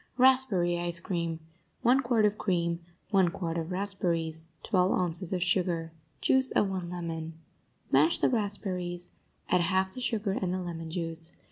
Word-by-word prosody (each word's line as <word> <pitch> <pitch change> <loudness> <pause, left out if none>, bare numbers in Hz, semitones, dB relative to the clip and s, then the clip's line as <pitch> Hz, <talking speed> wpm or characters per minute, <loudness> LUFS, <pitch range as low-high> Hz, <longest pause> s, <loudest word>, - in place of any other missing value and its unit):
RASPBERRY 245 -10 +5
ICE 175 0 0
CREAM 170 -2 -3 0.4
1 250 +3 +5
quart 240 -4 +2
of 210 0 +2
cream 170 -3 0 0.3
1 190 -4 +4
quart 170 -1 -4
of 165 +1 -3
raspberries 170 -4 -1 0.2
12 185 -1 +2
ounces 175 0 0
of 180 -2 0
sugar 175 -2 0 0.3
Juice 265 0 +4
of 195 - +2
one 180 -2 -4
lemon 165 -2 -5 0.6
Mash 150 +5 +4
the - - +2
raspberries; 185 -6 -2 0.4
add 180 - +3
half 190 +2 +1
the 255 - -6
sugar 220 -5 -1
and 190 -2 -1
the 185 - -1
lemon 165 -2 -5
juice. 165 -1 -3
180 Hz, 155 wpm, -29 LUFS, 170-195 Hz, 0.6 s, RASPBERRY